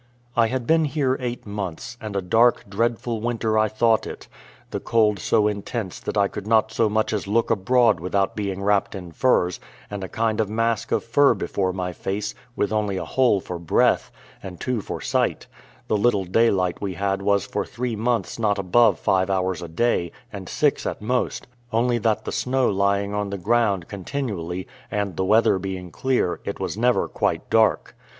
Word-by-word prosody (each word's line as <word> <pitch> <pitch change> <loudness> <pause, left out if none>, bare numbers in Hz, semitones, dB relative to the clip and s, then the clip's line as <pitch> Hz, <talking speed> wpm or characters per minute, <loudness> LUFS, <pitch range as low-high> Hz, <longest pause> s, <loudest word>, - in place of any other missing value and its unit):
I 115 -1 +4
had 130 +1 -3
been 160 +2 +3
here 135 -3 0
eight 125 -1 -4
months, 100 -1 -5
and 105 -2 -6
a 100 - -1
dark, 115 +7 +3
dreadful 115 +2 -1
winter 115 -2 -1
I 110 - +3
thought 110 +1 +2
it; - - -8 0.4
the - - -2
cold 105 -3 +2
so 105 -2 +2
intense 105 -1 -4
that - - -4
I 100 -1 +4
could 100 +1 -7
not 110 -1 +3
so 115 -1 +2
much 110 +1 0
as 105 -2 -2
look 115 +3 +1
abroad 115 -1 +3
without 95 +3 0
being 100 -2 -3
wrapped 100 0 +1
in 90 -3 -8
furs, 90 -2 +2 0.3
and 100 -1 -4
a 95 - -5
kind 110 -1 0
of 105 - -2
mask 115 0 -1
of - - +1
fur 140 +5 +4
before 95 -2 -1
my 90 -1 -4
face, 100 +4 -3 0.2
with 105 +1 0
only 105 -3 0
a - - -3
hole 125 -6 +2
for 90 -1 -6
breath, 85 - +2 0.3
and 90 -2 -9
two 125 -4 -1
for - - -6
sight: - - 0 0.4
the 105 - +1
little 100 -3 +2
daylight 95 -2 +2
we 95 -3 -3
had 100 +2 -1
was 100 -1 +2
for - - -2
three 120 -1 -4
months 115 -1 -1
not 105 -2 +1
above 100 +1 +4
five 95 0 +1
hours 95 -2 0
a 85 - -6
day, 85 -1 0 0.2
and - - -7
six - - +1
at - - -5
most; 125 +3 -1 0.3
only 120 +1 +2
that 110 -1 0
the - - -3
snow 130 0 +1
lying 100 0 +1
on 105 -1 -2
the 100 - -4
ground 100 -3 +1
continually, 95 -5 -4 0.2
and 100 -4 -2
the 95 - -1
weather 110 -1 +4
being 95 -2 -5
clear, 125 -1 0
it - - -5
was - - -3
never 120 +3 +2
quite - - -1
dark. 110 -1 +2
105 Hz, 190 wpm, -23 LUFS, 95-115 Hz, 0.4 s, I